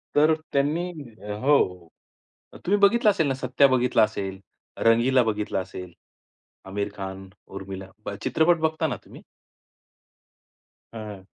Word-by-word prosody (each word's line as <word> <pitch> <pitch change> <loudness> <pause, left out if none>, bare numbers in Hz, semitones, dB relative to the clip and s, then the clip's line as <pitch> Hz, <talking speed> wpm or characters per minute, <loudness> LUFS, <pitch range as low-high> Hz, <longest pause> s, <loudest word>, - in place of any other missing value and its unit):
तर 155 +2 +5 0.2
त्यांनी 155 +6 +1 0.5
हो, 90 - +2 0.8
तुम्ही 200 +3 +3
बघितलं 215 +2 +5
असेल 165 -7 +2
ना, 135 - +1
सत्या 130 +2 +3
बघितला 125 -3 +3
असेल, 95 -3 -2 0.4
रंगीला 120 +3 +4
बघितला 105 -3 -1
असेल, 90 -1 -7 0.7
आमिर 100 +1 -3
खान, 95 -1 -7 0.2
उर्मिला. 95 0 -8 0.2
बघ 100 0 -4
चित्रपट 160 +6 +3
बघता 160 0 +1
ना 125 - -2
तुम्ही? - - -13 1.7
हां. 105 -4 -8
120 Hz, 115 wpm, -25 LUFS, 95-150 Hz, 1.7 s, तर